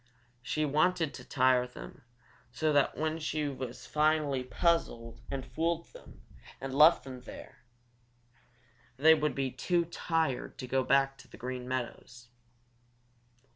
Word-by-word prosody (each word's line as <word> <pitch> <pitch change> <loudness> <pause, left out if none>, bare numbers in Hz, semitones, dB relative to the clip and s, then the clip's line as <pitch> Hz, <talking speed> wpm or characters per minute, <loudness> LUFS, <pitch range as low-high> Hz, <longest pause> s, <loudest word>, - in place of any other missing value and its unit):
She 155 +4 -1
wanted 155 +2 +1
to - - -9
tire 130 -1 +3
them 125 - -11 0.5
so 155 -1 0
that 145 -1 +2
when 160 +1 -1
she 155 -2 -2 0.2
finally 150 -1 0
puzzled 120 -6 -1
and 135 -2 -4
fooled 165 +5 -2
them - - -15 0.4
and 135 0 -5
left 155 +4 +6
them 130 -2 -9
there, - - -11 1.4
they 160 +4 +7
would 150 -1 0
be 135 -2 -1
too 170 +7 0
tired 165 -5 -2
to - - -6
go 130 +1 +1
back 135 +1 +2
to - - -15
the - - -14
Green 125 0 -5
Meadows. 125 -1 -5
140 Hz, 135 wpm, -31 LUFS, 130-155 Hz, 1.4 s, they